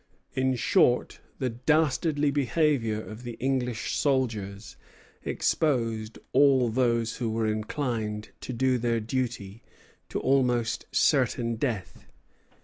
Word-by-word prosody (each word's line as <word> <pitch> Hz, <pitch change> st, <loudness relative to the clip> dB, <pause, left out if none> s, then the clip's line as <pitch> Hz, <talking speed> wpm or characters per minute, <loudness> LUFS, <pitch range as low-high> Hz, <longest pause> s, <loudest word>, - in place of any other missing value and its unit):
In 130 Hz, 0 st, +1 dB
short, 120 Hz, +1 st, +2 dB, 0.2 s
the 130 Hz, -3 st, -1 dB
dastardly 150 Hz, +3 st, +1 dB
behavior 140 Hz, -5 st, +1 dB
of 110 Hz, +1 st, -9 dB
the 120 Hz, -1 st, -6 dB
English 125 Hz, -2 st, -1 dB
soldiers 110 Hz, -8 st, -1 dB, 0.5 s
exposed 115 Hz, -7 st, 0 dB, 0.2 s
all 135 Hz, -3 st, +5 dB
those 115 Hz, -1 st, +1 dB
who 120 Hz, -3 st, -2 dB
were 110 Hz, 0 st, 0 dB
inclined 110 Hz, -1 st, -2 dB
to 130 Hz, -, -5 dB
do 130 Hz, +1 st, +1 dB
their 115 Hz, -1 st, +1 dB
duty 115 Hz, -3 st, -3 dB, 0.5 s
to -, -, -2 dB
almost 125 Hz, -4 st, +1 dB
certain 115 Hz, -1 st, +2 dB
death. 110 Hz, -, -4 dB
120 Hz, 110 wpm, -27 LUFS, 110-130 Hz, 0.5 s, all